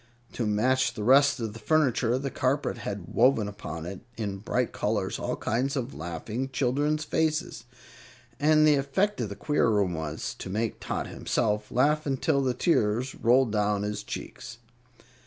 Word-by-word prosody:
To 115 - -2
match 125 +4 +2
the 105 - -4
rest 140 +4 +5
of 110 -3 -3
the 115 - -10
furniture, 125 -3 +2
the 135 0 -3
carpet 135 +3 -1
had 100 -3 -6
woven 120 -3 +4
upon 80 -6 -7
it 90 +1 -6 0.2
in 100 -3 -3
bright 120 +4 -1
colors 105 -3 -1
all - - -2
kinds 130 +5 -1
of 130 0 -3
laughing 110 +10 -4
children's 145 +4 0
faces, 155 0 -1 0.7
and 155 +1 +5
the 150 - +6
effect 165 +8 0
of 110 - -2
the 100 - -6
queer 145 -2 +1
room 100 -4 +2
was 80 -1 -4
to - - -6
make 110 +3 -2
Tot - - -3
himself 105 -3 -1
laugh 150 +4 +2
until 140 0 +1
the 130 -2 0
tears 120 -4 +1
roll 125 +3 +4
down 105 -2 0
his 105 0 -3
cheeks. - - -8
120 Hz, 165 wpm, -27 LUFS, 105-140 Hz, 0.7 s, the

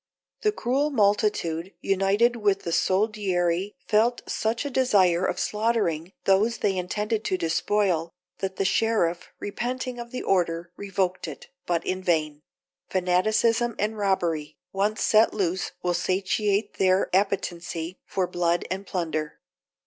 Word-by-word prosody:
The 425 - +3
cruel 280 - 0
multitude, 200 - +1
united 200 +5 +2
with 205 -3 +1
the 170 - -3
soldiery, 190 -1 +1
felt 230 +3 +2
such 225 +4 -1
a 285 - -3
desire 195 -9 +3
of - - -2
slaughtering 210 -6 0
those 210 +4 +3
they 195 -2 0
intended 210 +4 -2
to 185 - 0
despoil, 170 0 0 0.3
that 190 -1 -3
the 195 - -1
sheriff, 180 -5 +1
repenting 245 +4 -4
of 235 0 -7
the 255 - -5
order, 170 -2 0
revoked 190 -3 -2
it, 150 - -9 0.2
but 170 -1 0
in 185 0 -2
vain; 155 -4 0 0.5
fanaticism 215 +6 +2
and 215 +1 -1
robbery 170 -7 -1 0.2
once 205 +3 0
set 215 0 +4
loose 185 -3 -1
will 180 0 +1
satiate 195 +3 0
their 185 -1 +3
appetency 175 -3 -1
for 190 - 0
blood 175 -1 0
and 195 +1 -4
plunder. 155 -4 -3
195 Hz, 135 wpm, -26 LUFS, 175-215 Hz, 0.5 s, set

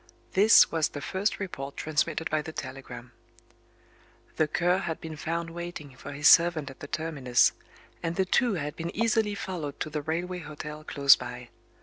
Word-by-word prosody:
This 210 +4 +7
was 160 -2 +1
the 145 - -7
first 190 +8 -1
report 140 -8 -6
transmitted 155 +1 -1
by 155 0 +1
the 160 - -7
telegram: 130 -4 -8 1.3
The 155 - +3
Cur 175 +4 +1
had 165 -4 -4
been 160 -1 -7
found 165 +2 -3
waiting 170 -5 -7
for 130 - -9
his 145 +2 +2
servant 165 -4 +5
at 135 - -16
the 145 - -8
terminus; 140 -6 +2 0.5
and 165 0 -2
the 190 - +1
two 235 +3 +2
had 150 -3 -4
been 165 0 -4
easily 220 -1 +1
followed 170 -8 -5
to 155 - -3
the 150 0 -2
railway 175 +4 -3
hotel 150 -1 -8
close 140 -2 +6
by. 125 -1 -8
160 Hz, 170 wpm, -28 LUFS, 145-175 Hz, 1.3 s, This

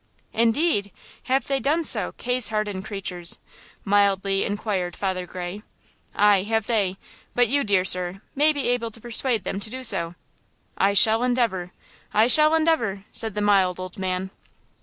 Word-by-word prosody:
"Indeed! 230 - +1 0.3
have 265 +1 0
they 275 -1 -1
done 305 +5 0
so, - - +5
case 250 -2 -1
hardened 210 -3 -3
creatures?" 180 -4 -2 0.5
mildly 195 -1 +2
inquired 200 -4 -3
Father 185 -2 -3
Gray. 180 +3 -7 0.5
"Aye, 205 -2 +4
have 220 +1 -1
they; 200 -5 0 0.4
but 245 -2 +3
you, 285 +2 +1
dear 195 -3 +1
sir, 180 +1 +1
may 300 +2 +3
be 285 -2 -3
able 245 -2 -1
to 225 - -8
persuade 235 -1 0
them 195 - -4
to 205 - -5
do 260 +3 -7
so." 170 -7 +3 0.6
"I 200 +1 +1
shall 220 +3 +4
endeavor! 230 -8 -1 0.4
I 215 +2 +5
shall 305 +5 +5
endeavor!" 235 -12 0
said 220 -3 -3
the 210 - -2
mild 195 -3 +2
old 185 0 -8
man. 185 0 -3
205 Hz, 160 wpm, -23 LUFS, 190-245 Hz, 0.6 s, so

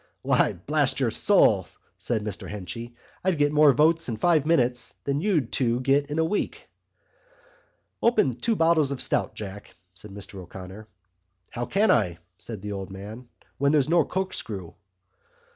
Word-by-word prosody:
"Why, - - +3
blast - - 0
your - - +1
soul," - - +4 0.3
said 110 -3 -2
Mr 105 -2 -5
Henchy, 115 +4 -7 0.3
"I'd 185 -3 +1
get 145 0 +2
more 150 -1 +6
votes 160 +2 +2
in 115 - -3
five 155 +3 +2
minutes 125 -7 +1
than 140 +1 -1
you 190 -5 +2
two'd 120 0 -1
get 140 +2 +2
in 150 - -3
a 160 - +3
week." 205 +6 -3 1.3
"Open 215 - +3
two 225 - 0
bottles 165 -5 +3
of 140 -2 -4
stout, - - 0
Jack," 105 -1 -8 0.2
said 95 +3 -11
Mr 100 0 -9
O'Connor. 95 +4 -10 0.6
"How 120 +1 -4
can 210 +3 +3
I?" 90 -8 +2 0.2
said 110 -4 -8
the 105 - -4
old 95 -2 -5
man, 105 +6 -9 0.3
"when 140 +1 +3
there's 150 -2 +2
no 170 -1 +4
corkscrew?" 110 - -4
125 Hz, 160 wpm, -25 LUFS, 105-155 Hz, 1.3 s, more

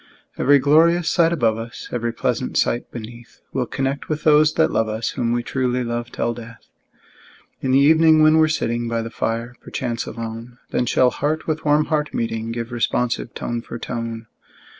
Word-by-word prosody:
Every 145 +2 +4
glorious 165 +5 +4
sight 170 -2 +3
above 115 -9 +1
us, 115 0 -8
Every 120 -1 -1
pleasant 115 - -2
sight 120 - 0
beneath, 120 +1 -10
We'll 125 -2 -1
connect 135 +3 -3
with 155 -1 -2
those 155 0 +5
that 160 - +3
love 110 -1 +1
us, 110 +1 -2
Whom 115 -1 -1
we 120 0 0
truly 125 -1 -1
love 120 0 -4
till 120 - -1
death! 115 -1 -11 1.0
In 130 - -2
the 130 - +4
evening, 155 +2 +5
when 155 +1 +6
we're 155 - +5
sitting 120 -6 -1
By 115 0 -1
the 115 - -7
fire, 115 +2 -3
perchance 120 -3 -4
alone, 115 +1 -7
Then 125 - 0
shall 125 +2 +3
heart 155 +2 -2
with 160 0 -3
warm 150 +1 +3
heart 150 -2 -1
meeting, 115 0 -2
Give 115 0 -5
responsive 120 0 -1
tone 120 0 -3
for 120 - -8
tone. 115 -1 -5
120 Hz, 185 wpm, -21 LUFS, 115-150 Hz, 1.0 s, when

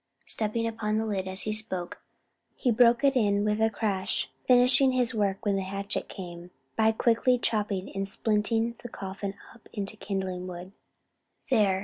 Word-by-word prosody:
Stepping 225 +1 -1
upon 220 -2 -2
the 220 - -1
lid 195 -3 -2
as 190 0 +2
he 215 - -2
spoke, 190 -5 -3 0.5
he 245 - 0
broke 235 +2 +4
it 275 -1 +3
in 205 -4 +2
with 210 +1 0
a 220 - +4
crash, 200 -3 0 0.2
finishing 255 +1 +5
his 250 0 +3
work 200 -2 -1
when 200 -1 +1
the 195 - -1
hatchet 195 +2 -2
came, 175 -2 -9 0.3
by 220 0 +3
quickly 235 +3 +2
chopping 205 -5 0
and 195 0 -2
splitting 225 +3 +1
the 240 - -8
coffin 195 -1 -6 0.2
up 230 - -20
into 205 0 -3
kindling 190 -3 -4
wood. 180 +1 -8 0.8
"There!" 200 -6 +3
210 Hz, 165 wpm, -27 LUFS, 195-230 Hz, 0.8 s, finishing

